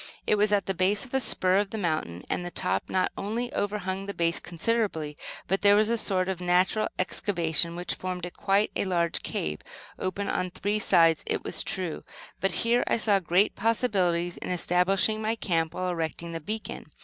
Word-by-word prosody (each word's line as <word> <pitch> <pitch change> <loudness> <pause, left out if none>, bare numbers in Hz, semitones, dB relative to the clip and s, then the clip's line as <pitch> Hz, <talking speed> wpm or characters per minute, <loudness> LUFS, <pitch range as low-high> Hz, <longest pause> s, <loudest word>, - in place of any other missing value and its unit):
It - - +2
was 210 0 +3
at 205 -1 +2
the 195 - -1
base 190 +3 +1
of 255 - -16
a 265 - +3
spur 185 -6 +3
of 205 0 +1
the 220 - -5
mountain; 155 - -2
and - - -2
the 175 - -4
top 95 - -1
not 185 -1 +1
only 235 +6 -3
overhung 195 -4 -2
the 200 - -5
base 170 0 +1
considerably, 170 -4 -1 0.3
but, 195 +1 0
there 205 0 +6
was 215 +1 +3
a 235 - +2
sort 185 -4 +1
of 190 -2 -3
natural 180 +4 +2
excavation 170 -3 +1
which 175 +1 -3
formed 180 -1 -4
quite 200 +2 +1
a - - 0
large 170 -3 0
cave, 75 0 -3 0.4
open 190 +2 -2
on 185 0 -1
three 205 +4 -2
sides, 165 -5 +4
it - - -1
was - - +1
true; 180 -4 -3 0.4
but 195 - +1
here 240 +1 +3
I - - +2
saw 210 -3 +3
great 180 +3 +2
possibilities 190 -6 +1
in - - -6
establishing 180 +4 +2
my 220 +1 0
camp 165 -7 -1
while 185 0 -2
erecting 170 0 -3
the 165 - -4
beacon. 215 +7 -5
185 Hz, 195 wpm, -27 LUFS, 170-205 Hz, 0.4 s, there